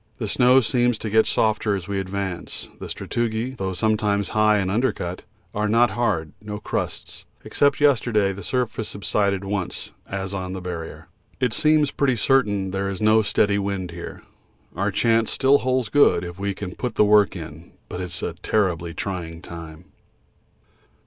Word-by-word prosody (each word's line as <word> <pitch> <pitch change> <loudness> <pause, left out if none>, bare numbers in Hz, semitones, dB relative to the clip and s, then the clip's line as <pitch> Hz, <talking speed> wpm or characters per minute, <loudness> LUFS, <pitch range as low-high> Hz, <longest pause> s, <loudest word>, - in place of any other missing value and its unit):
The - - -3
snow 125 +2 +5
seems 120 0 +1
to 110 - -5
get 110 +1 +4
softer 105 -1 +1
as 95 -1 -5
we 100 -1 -2
advance; 95 -1 -4
the - - -6
sastrugi, 120 +1 -2
though 95 -4 -3
sometimes 105 0 +1
high 110 -1 +3
and 95 -2 0
undercut, 100 -6 -1 0.3
are 105 0 0
not 115 +1 +4
hard 105 -9 -1
no 105 -1 -5
crusts, 105 - -5 0.2
except 140 0 +2
yesterday 115 -8 +3
the 100 - -8
surface 115 0 -2
subsided 100 -1 0
once, 95 -2 -3 0.2
as 95 0 -4
on 95 -1 -4
the 95 - -4
Barrier. 80 -2 -7 0.3
It 125 -3 +1
seems 150 0 +3
pretty 135 -3 +1
certain 105 -6 +2
there 95 +1 -1
is 95 - -4
no 110 +1 +5
steady 100 -1 +2
wind 100 -3 -3
here. 85 0 -8 0.5
Our 100 +4 0
chance 115 +2 +2
still 140 +1 +4
holds 130 -3 0
good 145 -4 +4
if 85 +1 -7
we 100 -1 -2
can 95 -1 -6
put 125 -3 -4
the 105 - +5
work 105 -2 +4
in, 80 -1 -9
but 90 - -5
it's 90 -2 -4
a - - -2
terribly 85 -6 0
trying 85 -4 -4
time. 85 0 -10
100 Hz, 170 wpm, -23 LUFS, 95-115 Hz, 0.5 s, snow